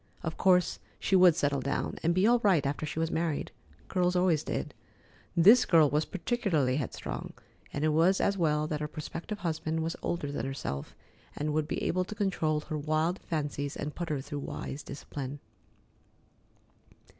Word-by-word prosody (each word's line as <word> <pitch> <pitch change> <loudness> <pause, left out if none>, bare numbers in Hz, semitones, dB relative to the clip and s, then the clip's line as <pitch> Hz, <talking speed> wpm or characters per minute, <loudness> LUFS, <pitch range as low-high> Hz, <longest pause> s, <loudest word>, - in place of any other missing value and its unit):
Of 165 -1 -3
course 180 -2 +3 0.2
she 195 - +1
would 180 -3 +7
settle 145 -4 +1
down 140 +2 -2
and 170 +1 +2
be 185 +2 +4
all 240 +2 +5
right 190 -10 +3
after 145 +2 -2
she 150 - -6
was 165 +1 0
married. 160 -2 -1 0.4
Girls 180 -1 +1
always 180 -4 +3
did. - - -4 0.6
This 210 +9 +8
girl 160 -4 +5
was 150 +2 +2
particularly 175 - 0
headstrong, 135 -6 -5 0.4
and 145 +2 -1
it - - +3
was 165 +5 +4
as 200 - +2
well 155 -4 +1
that 155 -1 -2
her 150 - -2
prospective 165 +6 -6
husband 160 -2 -2
was 165 +1 -2
older 150 -5 -2
than 135 -3 -3
herself, 70 - -5 0.4
and 150 +1 -2
would 155 0 0
be - - -3
able 185 +1 +1
to 215 - -7
control 165 -7 0
her 155 0 -4
wild 155 +4 0
fancies 145 -3 -3
and 150 +1 -4
put 175 -1 -4
her 145 -3 -1
through 145 +1 -5
wise 140 +1 -5
discipline. 140 -1 -7
155 Hz, 175 wpm, -30 LUFS, 145-180 Hz, 0.6 s, This